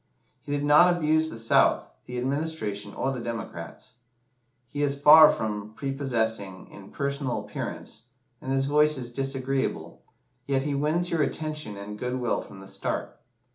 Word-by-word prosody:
"He 145 - -9
did 145 0 -1
not 150 +5 +6
abuse 160 -2 +2
the 115 - -7
South, 115 0 +3
the 125 - -6
Administration, 130 -7 -2
or 135 - -1
the 130 - -4
Democrats. 115 -1 -7 0.7
He 145 +4 -5
is 140 -1 0
far 155 +2 +9
from 105 0 -3
prepossessing 115 -8 -2
in 100 -1 -12
personal 140 -3 -2
appearance, 110 +1 -6 0.4
and 130 - -4
his 135 0 +1
voice 150 +1 +3
is 120 -2 -6
disagreeable, 135 0 -2 0.5
yet 135 -1 +1
he 145 0 -1
wins 155 +5 0
your 165 -2 +1
attention 150 -9 -3
and 105 +1 -8
good 125 0 -2
will 120 -1 0
from 95 - -12
the 95 - -11
start. - - -3
135 Hz, 155 wpm, -26 LUFS, 115-150 Hz, 0.7 s, far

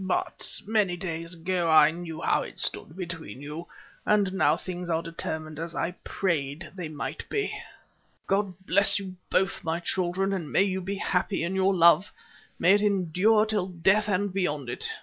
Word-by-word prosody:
But 185 - -1
many 205 -4 +1
days 165 -1 -5
ago 175 0 -1
I 155 -1 +7
knew 165 -1 -7
how - - +2
it - - -8
stood 155 - -1
between 170 -7 -6
you, 150 +4 -7 0.4
and 205 -3 +2
now 195 - +3
things 180 -1 -6
are 165 0 0
determined 155 -2 -5
as 165 +1 -5
I 170 - -1
prayed 155 -3 -2
they 180 -4 -6
might 150 -2 -6
be. 415 -1 -1 0.7
God 195 -1 0
bless 200 +2 +4
you 190 -2 -6
both, 195 +1 +1
my 165 +1 -1
children; 185 -1 -1
may 190 - +4
you 190 -1 -1
be 195 +2 -3
happy 190 -1 0
in 170 +3 -2
your 190 0 +2
love; 170 +2 +5 0.5
may 180 - +5
it 205 - +4
endure 205 +2 +3
till 210 -4 +1
death 190 +4 +2
and 200 0 0
beyond 150 -9 -1
it. - - -1
180 Hz, 170 wpm, -27 LUFS, 165-195 Hz, 0.7 s, I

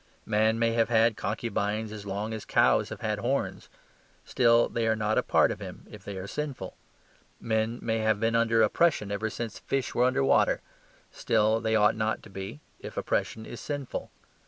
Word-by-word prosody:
Man 110 +1 +2
may 115 0 +2
have 115 0 +1
had 115 -1 +4
concubines 105 0 -2
as 105 -2 -8
long 105 +3 -3
as 110 - -5
cows - - +3
have - - -8
had 105 -1 -1
horns: 130 +6 -2 0.6
still 120 -2 +4
they 115 -1 -1
are 110 - +3
not 110 0 +1
a - - +2
part - - +3
of - - -5
him - - -9
if - - -11
they 100 -1 -6
are 95 - -5
sinful. 135 -5 -5 0.6
Men 110 +1 -1
may 115 -1 0
have 110 -1 +1
been 115 +1 +1
under 115 -1 +3
oppression 110 -3 +2
ever 105 +2 -1
since 115 +1 -5
fish 130 -4 -2
were 125 - +3
under 130 +2 +2
water; - - +3 0.5
still 110 +1 +2
they 110 0 0
ought 105 -1 +4
not 110 0 -1
to 105 - -13
be, 95 +9 -7 0.2
if - - -9
oppression 110 0 -1
is 120 - -8
sinful. 145 -3 -5
110 Hz, 190 wpm, -28 LUFS, 105-115 Hz, 0.6 s, had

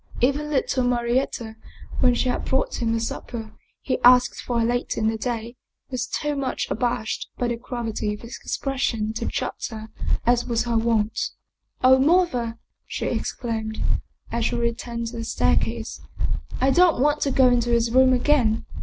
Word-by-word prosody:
Even 280 +4 +1
little 265 -2 +1
Mari 240 0 +2
etta, 225 -4 -5 0.4
when 250 -1 +4
she 255 - 0
had 250 - -1
brought 265 0 0
him 230 -1 +1
the 230 - +1
supper 225 -1 -5 0.3
he 260 - -1
asked 250 0 +6
for 235 -2 0
later 245 +1 -1
in 220 - +1
the 225 - +1
day, 235 +1 -4 0.3
was 245 -2 -2
too 295 -1 -2
much 275 -2 -1
abashed 235 -3 -1
by 245 - 0
the 240 - -1
gravity 230 -3 -3
of - - -14
his 230 +1 -8
expression 235 -6 -2
to 225 - -3
chatter 220 -1 -4 0.4
as 245 0 +3
was 235 -1 +1
her 240 -1 -1
wont. 225 -1 +1 0.3
" - - -35
Oh, 260 +1 +7
mother," 265 -7 +2 0.3
she - - -4
exclaimed, 220 -2 -3 0.5
as 235 -1 0
she 240 - 0
returned 235 0 -2
to 235 - -8
the 230 - -3
staircase, 225 - 0 0.3
" - - -6
I 265 +1 +3
don't 350 -1 +5
want 295 +3 +2
to 280 - +2
go 260 -1 +5
into 240 -1 +2
his 235 -1 +2
room 260 +1 +6
again. 245 -4 +2
240 Hz, 175 wpm, -24 LUFS, 230-260 Hz, 0.5 s, Oh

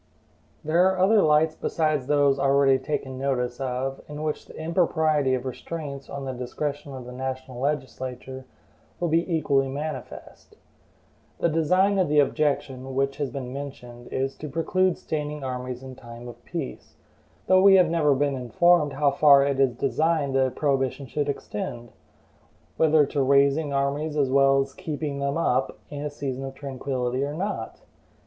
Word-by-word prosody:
There 170 +5 +4
are 190 - -1
other 200 +3 +5
lights 155 0 +3
besides 155 -5 -1
those 145 -1 +3
already 135 -1 +4
taken 130 -1 -4
notice 125 -2 -1
of, 135 +1 -3
in 150 +1 -6
which 155 -1 -3
the - - -12
impropriety 160 -4 +1
of 125 0 -5
restraints 140 +1 -6
on 140 -1 -6
the 130 - -3
discretion 140 +3 -4
of 130 -2 -8
the 125 - -9
national 130 0 -5
legislature 130 -2 -4 0.5
will 175 - 0
be 165 +3 +1
equally 140 -4 +2
manifest. 140 0 -7 0.8
The 170 - +1
design 185 +5 +2
of 180 - +2
the 150 - +2
objection, 140 -3 0
which 135 +1 0
has 145 -2 -2
been 130 -3 -6
mentioned, 125 -4 -8
is 135 +1 -2
to 150 - -7
preclude 180 +4 +1
standing 150 -1 -4
armies 125 -1 -5
in 130 -1 -8
time 120 -1 -11
of 120 0 -11
peace, 60 - -6 0.5
though 185 0 +5
we 195 0 +7
have 180 -3 +5
never 150 -4 +3
been 140 0 0
informed 150 +5 +3
how 145 0 +2
far 140 -1 +6
it 140 -1 -1
is 130 -3 +3
designed 150 +2 0
the 135 -1 +3
prohibition 135 0 -1
should 145 +3 -2
extend; 120 -2 -5 0.8
whether 155 -2 +4
to 140 0 -1
raising 140 +2 +3
armies 140 +3 -1
as 135 -3 +2
well 135 0 +5
as 135 0 -4
to - - -29
KEEPING 150 -2 -4
THEM 140 +2 -1
UP 135 -5 0
in 145 -1 -5
a 150 - -2
season 135 -2 -5
of 135 0 -6
tranquillity 130 -2 -3
or 145 +1 -3
not. 185 - -4
140 Hz, 165 wpm, -25 LUFS, 130-155 Hz, 0.8 s, we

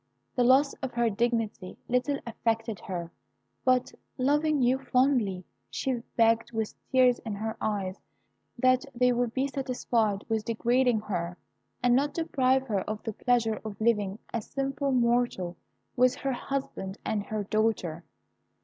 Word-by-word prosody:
The 250 - +3
loss 270 +3 +5
of 265 -2 -4
her 235 -1 +2
dignity 225 -4 -1
little 250 +3 +1
affected 225 -2 -1
her; 170 -2 -5 0.5
but, 255 -1 +2 0.2
loving 295 +3 +2
you 255 +2 +3
fondly, 250 -8 +1 0.2
she 255 -3 -2 0.2
begged, 230 0 +3
with 220 -2 -2 0.2
tears 255 -2 +5
in 220 -3 -5
her 220 +2 -3
eyes, 200 -3 -2 0.6
that 255 +1 +4
they 250 +1 +4
would 245 -1 0
be 265 +3 0
satisfied 245 -6 -1
with 220 -2 0
degrading 240 +1 +2
her, 175 -4 -3 0.5
and 245 0 +5
not 285 +3 +1
deprive 265 -5 +2
her 205 -6 0
of 215 0 -4
the 225 - -3
pleasure 230 -2 +1
of 215 -2 -7
living 210 -3 +1 0.2
as 230 -2 -3
a - - -29
simple 275 0 -1
mortal 235 -8 +1 0.4
with 250 0 +4
her 275 -1 -2
husband 245 -7 -4
and 205 -2 -1
her 215 -1 -2
dear 215 +2 +1
daughter. 175 -7 -1
235 Hz, 150 wpm, -28 LUFS, 215-255 Hz, 0.6 s, loss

